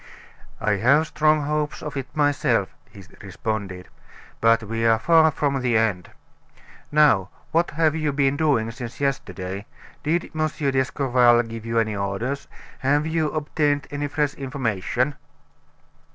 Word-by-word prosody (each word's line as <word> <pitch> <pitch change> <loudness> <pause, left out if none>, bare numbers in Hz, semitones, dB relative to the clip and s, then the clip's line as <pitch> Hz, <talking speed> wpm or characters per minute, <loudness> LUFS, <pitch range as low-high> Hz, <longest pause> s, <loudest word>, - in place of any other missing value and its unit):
"I 105 -1 +1
have 140 +9 +4
strong 155 -1 +2
hopes 150 +1 -2
of 150 -1 -6
it 135 -2 -4
myself," 145 -1 +1 0.2
he - - -13 0.2
responded; 100 -4 -5 0.5
"but 115 0 +3
we 115 +1 -3
are 115 -1 +4
far 160 +5 +5
from 140 -2 -1
the 120 -2 +2
end. 105 -6 0 0.8
Now, 145 -11 +4 0.2
what 170 +2 +2
have 160 -2 +3
you 155 -2 -1
been 140 -1 +1
doing 140 -8 +1
since 120 -1 -8
yesterday? 100 -8 -3 0.3
Did 165 +3 -1
M. 155 0 +1
d'Escorval 130 -4 +2
give 115 -1 -8
you 115 0 -1
any 110 -2 +1
orders? 100 +8 -3 0.3
Have 145 +3 +1
you 160 -1 0
obtained 145 -2 0
any 145 0 -2
fresh 145 0 -1
information?" 130 -1 -2
135 Hz, 135 wpm, -23 LUFS, 115-150 Hz, 0.8 s, far